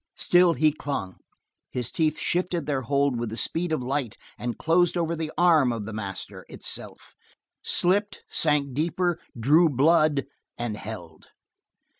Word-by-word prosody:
Still, 175 -1 +4
he 155 +2 +3
clung; 140 -11 -5 0.5
his 125 -3 -2
teeth 155 -2 0
shifted 175 -3 -1
their 140 -3 -1
hold 140 0 +1
with 120 -1 -2
the 110 - -6
speed 170 +5 -1
of 155 -5 -1
light 130 -3 -2 0.2
and 120 -1 -4
closed 175 +2 +2
over 170 -1 0
the 160 -1 -4
arm 160 -7 +5
of 115 -3 -4
the 110 - -6
master 100 -3 -6
itself, - - -6 0.5
slipped, 200 +4 +1
sank 145 -4 +1
deeper, 170 +4 0 0.2
drew 155 +8 +5
blood, 150 +1 +3 0.3
and 120 -3 -3
held. 90 -7 -9
145 Hz, 145 wpm, -26 LUFS, 120-170 Hz, 0.5 s, arm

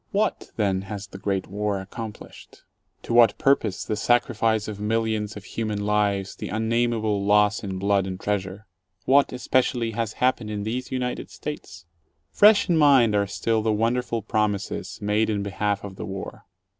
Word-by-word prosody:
What, 210 +1 -1
then, 100 -4 0
has 105 -1 -5
the 95 - -11
Great 95 -1 -1
War 105 0 -2
accomplished? 105 +3 -10 0.4
To - - -4
what 115 -3 +6
pur 140 -2 +5
pose 105 -8 -5
the 110 - -2
sacrifice 110 -1 +1
of 105 -2 -6
millions 110 0 -1
of 100 - -9
human 105 -1 -3
lives, 100 -2 0
the - - -6
unnamable 110 -2 0
loss 105 +1 +3
in 95 -2 -4
blood 100 0 +1
and 95 -1 -5
treasure? 100 0 -3 0.4
What, 140 +2 +4
especially, 125 -2 0
has 110 0 -3
happened 125 -3 0
in 105 -1 -3
these 125 +4 -4
United 125 -1 -3
States? 90 - -8 0.5
Fresh 210 0 +6
in 175 -3 +2
mind 135 -7 +5
are 100 -1 +2
still 110 +3 0
the 110 0 +1
wonderful 115 +1 0
promises 105 -2 -2
made 105 +2 +1
in 105 -2 -1
behalf 100 0 -2
of 95 -2 -8
the - - -5
War. 95 0 -7
105 Hz, 170 wpm, -24 LUFS, 100-115 Hz, 0.5 s, what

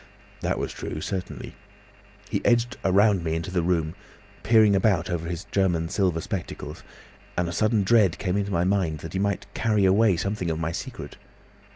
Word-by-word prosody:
That - - -1
was - - -3
true, - - -5
certainly. 95 +3 -5 0.8
He - - -1
edged 120 +1 +2
round 100 -1 +4
me 80 -1 -1
into 85 +3 -3
the 90 -2 +1
room, 85 -2 0 0.5
peering 110 -3 +5
about 95 -4 +2
over 85 -1 -2
his 85 +1 -4
German 85 -4 +1
silver 90 -5 +1
spectacles, 95 0 -6 0.6
and 90 -1 +1
a - - -3
sudden 110 +3 +2
dread 95 -4 +4
came 95 -1 -1
into 100 0 -1
my 85 -2 +1
mind 90 -5 0
that 80 - -8
he 95 - -1
might 100 0 -1
carry 105 -4 +2
away 100 0 +4
something 100 -1 -2
of 80 - -1
my 80 0 -2
secret. - - -7
95 Hz, 180 wpm, -25 LUFS, 85-100 Hz, 0.8 s, peering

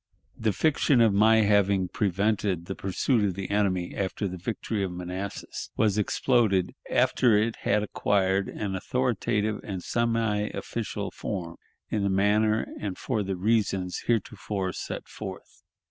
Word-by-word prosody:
The 110 -1 0
fiction 145 - +2
of 115 -3 +5
my 110 +2 +5
having 100 -2 +3
prevented 100 -2 0
the 95 - -4
pursuit 105 +5 0
of 95 -3 0
the 95 0 -5
enemy 95 -4 +1
after 100 +1 -2
the 90 - -5
victory 110 +2 -3
of 95 - -2
Manassas 90 +2 -5
was 105 -2 +2
exploded 105 -4 +2 0.2
after 115 -5 +4
it 110 +2 0
had 105 - +1
acquired 100 -2 +1
an 100 -2 -4
authoritative 110 -1 0
and 95 -3 -5
semi 115 -3 0
official 115 -2 -4
form 85 -4 -5 0.3
in 105 - 0
the 100 - +1
manner 105 +3 +2
and 100 -3 -4
for 115 -5 -1
the 95 -1 -2
reasons 95 -2 0
heretofore 100 -4 -1
set - - -6
forth. - - -9
100 Hz, 145 wpm, -27 LUFS, 95-110 Hz, 0.3 s, of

